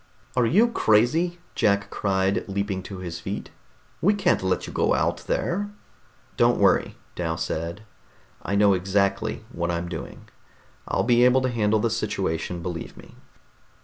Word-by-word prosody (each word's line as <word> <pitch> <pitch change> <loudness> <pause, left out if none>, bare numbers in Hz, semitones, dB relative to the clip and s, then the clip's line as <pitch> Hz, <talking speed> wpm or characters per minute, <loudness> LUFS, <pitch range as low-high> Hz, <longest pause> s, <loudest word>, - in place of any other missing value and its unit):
"Are 125 -2 +3
you 215 - +4
crazy?" 160 - +2 0.2
Jack 100 -1 +1
cried, 95 +1 0
leaping 100 -1 -2
to 95 +1 -8
his 85 -2 -6
feet. 95 +4 -5 0.5
"We 205 +4 +4
can't 190 -3 +2
let 95 0 0
you - - -8
go - - +2
out - - +1
there." 205 +4 -1 0.7
"Don't - - +4
worry," - - +3 0.2
Dal 80 -2 -2
said. 85 +4 -4 0.6
"I 100 - -2
know 100 -1 +5
exactly 100 +3 0
what 85 +1 -2
I'm 85 0 -2
doing. 80 -3 -8 0.6
I'll - - 0
be 120 0 +4
able 125 +1 +5
to 130 - 0
handle 110 -2 +1
the 115 +1 0
situation, 90 -6 -2
believe 85 -2 -5
me." - - -14
100 Hz, 150 wpm, -25 LUFS, 90-120 Hz, 0.7 s, know